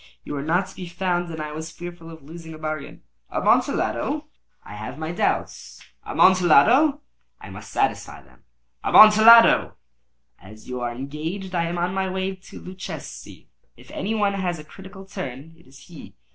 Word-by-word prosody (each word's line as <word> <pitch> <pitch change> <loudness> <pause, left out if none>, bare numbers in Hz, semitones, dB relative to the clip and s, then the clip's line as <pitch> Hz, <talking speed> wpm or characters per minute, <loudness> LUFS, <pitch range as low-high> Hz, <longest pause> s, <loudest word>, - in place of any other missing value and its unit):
You - - -7
were 140 - -3
not 170 +6 0
to 190 - -14
be 180 - -8
found, 175 0 -2
and 160 -1 -7
I 150 0 -5
was 160 +2 -6
fearful 175 0 -10
of 160 -3 -12
losing 160 +2 -10
a - - -11
bargain." 155 -2 -6 0.3
"Amontillado!" - - 0 0.4
"I - - -11
have 110 +6 -8
my 160 +1 -4
doubts." 175 - -3 0.2
"Amontillado!" 185 - +5
"And 290 +1 -10 0.4
I - - -11
must - - -11
satisfy - - -2
them." - - -24 0.4
"Amontillado!" 220 +2 +7 0.6
"As 105 +4 -15
you 125 -1 -5
are 120 -1 -2
engaged, 155 +9 -6
I 170 -1 0
am 170 +1 -4
on 175 +1 -1
my 190 0 -1
way 190 +1 -3
to 185 - -13
Luchesi. 185 +1 -9 0.3
If - - -16
any 215 +3 -3
one 205 -2 +1
has 185 -3 -2
a 155 - -10
critical 190 +4 -13
turn, 160 -5 -8
it 165 - -23
is 135 +1 -17
he. 170 -4 -13
175 Hz, 175 wpm, -23 LUFS, 155-190 Hz, 0.6 s, Amontillado